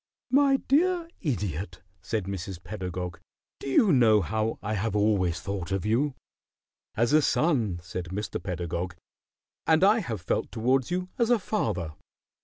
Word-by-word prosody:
"My 275 Hz, 0 st, +5 dB
dear 340 Hz, +6 st, +2 dB
Idiot," 95 Hz, -, -3 dB, 0.2 s
said 105 Hz, +3 st, -2 dB
Mrs. 95 Hz, -1 st, -6 dB
Pedagog, 90 Hz, -1 st, -5 dB, 0.4 s
"do 140 Hz, -, -5 dB
you 180 Hz, -, +5 dB
know 110 Hz, -5 st, +5 dB
how 110 Hz, +4 st, -1 dB
I 105 Hz, +1 st, -2 dB
have 105 Hz, 0 st, -1 dB
always 100 Hz, -5 st, +2 dB
thought 100 Hz, -3 st, -4 dB
of 95 Hz, 0 st, -1 dB
you?" 130 Hz, +6 st, +1 dB, 0.8 s
"As 120 Hz, +5 st, +2 dB
a 155 Hz, -, +6 dB
son," 125 Hz, -, +1 dB
said 90 Hz, +1 st, -5 dB
Mr. 100 Hz, +5 st, -4 dB
Pedagog. 85 Hz, -1 st, -3 dB, 0.7 s
"And 160 Hz, +2 st, +4 dB
I 210 Hz, +4 st, +6 dB
have 115 Hz, -, -4 dB
felt 90 Hz, -, -1 dB
towards 125 Hz, +3 st, +1 dB
you 180 Hz, +1 st, -2 dB
as 235 Hz, -1 st, +3 dB
a 240 Hz, -, +5 dB
father." 105 Hz, -, -2 dB
110 Hz, 150 wpm, -27 LUFS, 90-150 Hz, 0.8 s, a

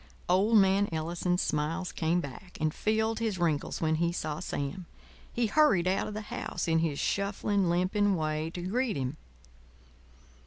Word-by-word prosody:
Old 200 Hz, +5 st, +4 dB
man 195 Hz, 0 st, +4 dB
Ellison's 170 Hz, +3 st, -1 dB
smiles 165 Hz, +5 st, -1 dB
came 170 Hz, +2 st, 0 dB
back 145 Hz, +6 st, -9 dB
and 155 Hz, 0 st, 0 dB
filled 220 Hz, +1 st, 0 dB
his 220 Hz, -4 st, -1 dB
wrinkles 165 Hz, -5 st, -1 dB
when 160 Hz, -1 st, +2 dB
he 170 Hz, 0 st, +2 dB
saw 155 Hz, -3 st, -3 dB
Sam. 165 Hz, 0 st, -4 dB, 0.4 s
He 240 Hz, -, 0 dB
hurried 215 Hz, -, +4 dB
out 190 Hz, +1 st, +1 dB
of 210 Hz, -, -6 dB
the 215 Hz, -, -3 dB
house 180 Hz, -4 st, -4 dB
in 165 Hz, 0 st, +3 dB
his 160 Hz, -3 st, 0 dB
shuffling, 200 Hz, 0 st, 0 dB
limping 190 Hz, +3 st, +2 dB
way 155 Hz, -1 st, -1 dB
to 175 Hz, +1 st, -6 dB
greet 225 Hz, -, 0 dB
him. 135 Hz, +2 st, -3 dB
180 Hz, 160 wpm, -29 LUFS, 160-205 Hz, 0.4 s, Old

